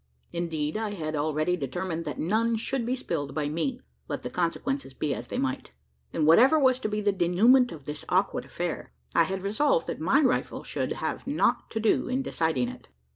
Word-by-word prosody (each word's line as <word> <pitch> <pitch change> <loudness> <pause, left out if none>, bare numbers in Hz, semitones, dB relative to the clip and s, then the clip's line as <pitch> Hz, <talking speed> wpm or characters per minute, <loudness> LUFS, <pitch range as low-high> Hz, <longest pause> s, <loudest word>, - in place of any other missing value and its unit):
Indeed, 160 -1 -2
I 215 -2 -3
had 155 -3 -3
already 155 +3 +1
determined 170 +2 -3
that 150 - -4
none 225 +7 +1
should 235 +2 -2
be 255 - +1
spilled 150 - -4
by 150 -2 -1
me 245 - -2 0.3
let - - -4
the - - -5
consequences 180 - -2
be 145 -2 -1
as - - -6
they - - -4
might; 265 0 -2 0.4
and 155 - 0
whatever 245 - +7
was 260 -3 +4
to 215 - -2
be 210 0 -1
the 205 0 +3
denouement 215 +8 +4
of 145 -4 -10
this 150 -1 -5
awkward - - +1
affair, - - -4 0.2
I - - +5
had 190 0 -4
resolved 215 - +2
that - - -5
my 265 - +4
rifle 260 -4 +1
should - - -2
have - - -4
nought - - +1
to 220 - -3
do 220 0 +2
in 260 +2 0
deciding 160 - 0
it. 125 0 -11
185 Hz, 200 wpm, -27 LUFS, 155-250 Hz, 0.4 s, whatever